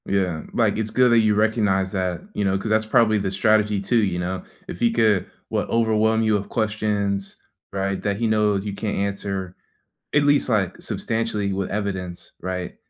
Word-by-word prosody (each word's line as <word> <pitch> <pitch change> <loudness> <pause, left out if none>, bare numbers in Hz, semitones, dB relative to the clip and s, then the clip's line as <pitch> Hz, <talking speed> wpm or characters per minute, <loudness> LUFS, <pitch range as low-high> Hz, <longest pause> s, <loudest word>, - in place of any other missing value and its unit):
Yeah, 90 -5 0
like, - - +2
it's 110 0 -1
good 125 +1 +4
that 120 - +6
you 110 -2 +3
recognize 105 -3 +1
that, 90 -3 -2
you 105 - -1
know, 95 0 +1
‘cause 105 +3 -4
that's 110 0 +3
probably 110 -1 +4
the 95 - -1
strategy 105 +1 +2
too, 110 +4 +2
you 95 -3 0
know, 90 +1 -3 0.2
if 85 - -7
he 120 -1 +3
could, 110 -5 +2 0.2
what, - - -1
overwhelm 110 -1 +2
you 110 -1 +2
with 100 -1 -3
questions, 105 -3 -1 0.3
right, 100 0 -2
that 100 -1 -1
he 115 - -1
knows 105 -2 +1
you 100 - -3
can't 105 +1 -3
answer 100 -2 -3 0.6
at 150 - +4
least, 145 0 +3
like, 105 -7 0
substantially 110 -3 -2
with 95 0 -2
evidence, 95 -4 -4
right, 90 0 -4
105 Hz, 185 wpm, -23 LUFS, 95-110 Hz, 0.6 s, that